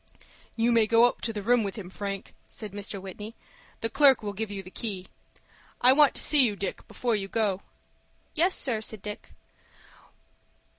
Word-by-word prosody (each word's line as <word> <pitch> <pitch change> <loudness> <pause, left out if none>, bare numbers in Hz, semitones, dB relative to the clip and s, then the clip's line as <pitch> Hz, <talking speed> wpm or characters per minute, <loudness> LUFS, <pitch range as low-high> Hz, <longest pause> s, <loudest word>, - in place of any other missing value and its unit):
"You 230 +1 +2
may 230 -2 +4
go 230 +2 +6
up 245 - 0
to 230 - -2
the 210 -2 -5
room 240 +2 +3
with 200 -2 -4
him, 190 -5 -8
Frank," 195 0 -6 0.2
said 215 -3 -6
Mr. 200 0 -4
Whitney. 205 +4 -8 0.5
"The 225 - 0
clerk 275 -2 +5
will 205 -1 -4
give 220 +2 -3
you 200 -1 -6
the 185 - -12
key. 195 -5 -4 0.7
I 255 +1 +6
want 295 0 +5
to - - -1
see 295 -3 +5
you, 215 -4 +1
Dick, 200 - -5
before 240 -3 -1
you 195 -2 -3
go." 200 -3 -1 0.7
"Yes, 350 +4 +2
sir," 235 -5 +1
said 220 -2 -5
Dick. 210 0 -8
215 Hz, 185 wpm, -27 LUFS, 200-240 Hz, 0.7 s, go